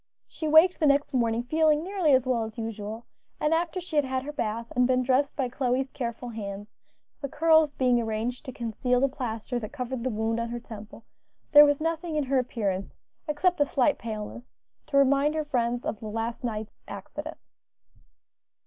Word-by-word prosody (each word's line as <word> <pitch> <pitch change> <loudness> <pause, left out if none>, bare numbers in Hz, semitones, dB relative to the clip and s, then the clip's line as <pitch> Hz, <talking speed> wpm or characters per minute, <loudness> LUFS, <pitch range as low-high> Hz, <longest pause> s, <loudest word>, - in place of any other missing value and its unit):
She 315 - -5
waked 320 +4 +6
the 310 - +3
next 285 0 +2
morning 235 -2 +1
feeling 310 +3 +2
nearly 370 -4 +1
as 260 -2 +4
well 245 -3 +1
as 220 +1 -8
usual, 220 0 -5 0.3
and 300 +1 +2
after 340 +2 0
she 345 -3 -5
had 295 - +5
had 260 -1 -2
her 295 - -5
bath 230 -5 -3
and 250 0 +4
been 255 0 +2
dressed 270 +3 +1
by 265 -3 0
Chloe's 255 +1 -1
careful 240 -2 -5
hands, 205 -2 -6 0.5
the 280 - -3
curls 315 0 +4
being 250 -2 +3
arranged 225 +3 -3
to 260 - -5
conceal 245 +1 -1
the 275 - +3
plaster 245 -2 -4
that 215 -1 -7
covered 250 -3 -4
the 260 - 0
wound 225 0 -1
on 235 0 -2
her 240 0 -4
temple, 220 -1 -11 0.5
there 295 0 +10
was 290 -1 +2
nothing 325 0 -2
in 300 - +1
her 270 0 +1
appearance, 200 -6 -2 0.3
except 310 +2 +1
a - - +6
slight 280 +1 +1
paleness, 225 +2 -7 0.3
to 290 -2 +1
remind 280 +2 +4
her 310 -1 -1
friends 240 -3 -1
of 215 - -3
the 220 - -7
last 225 +3 -3
night's 220 -2 -4
accident. - - -7
255 Hz, 190 wpm, -27 LUFS, 230-295 Hz, 0.5 s, there